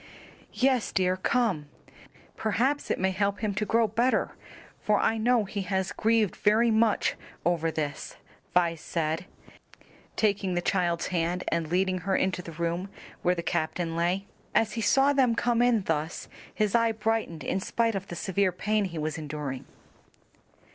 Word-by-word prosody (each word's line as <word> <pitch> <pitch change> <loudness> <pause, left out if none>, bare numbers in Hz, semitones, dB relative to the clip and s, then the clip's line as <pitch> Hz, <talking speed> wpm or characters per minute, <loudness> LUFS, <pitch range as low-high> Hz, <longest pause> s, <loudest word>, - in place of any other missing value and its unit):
"Yes, 255 -3 +2
dear, 185 -1 +2
come; 185 -6 0 0.7
perhaps 255 +7 0
it - - +1
may 190 +1 +1
help 200 +1 -1
him 215 -2 0
to 210 +2 -1
grow 230 0 +3
better, 235 +5 +1 0.5
for 210 -1 +2
I 225 - +1
know 240 0 +3
he 200 +1 -4
has 190 0 -1
grieved 220 -2 +2
very 225 +3 +3
much 220 -1 +2 0.3
over 165 -1 +1
this," 150 -2 -4 0.4
Vi 175 -2 +4
said, 165 +1 -3 0.9
taking 200 -4 +1
the 175 - +1
child's 175 -3 0
hand 175 +1 0
and 165 -1 -1
leading 185 +2 +1
her 190 +2 -1
into 185 -1 0
the 165 -2 -9
room 170 +3 -2 0.3
where 180 +1 +2
the 170 - -4
captain 165 +1 -1
lay. 175 +4 0 0.3
As 220 -2 +3
he 230 - -3
saw 270 +5 +4
them 255 -4 +3
come 240 0 +1
in 240 -4 +3
thus 160 -1 -2 0.2
his 210 -2 0
eye 230 -1 +3
brightened 220 -7 -1
in 190 - -1
spite 230 +4 0
of 195 -1 -4
the 175 - -6
severe 190 +1 +1
pain 210 +3 0
he 170 -3 -6
was 155 +1 -2
enduring. 145 -3 -5
190 Hz, 160 wpm, -28 LUFS, 170-220 Hz, 0.9 s, Vi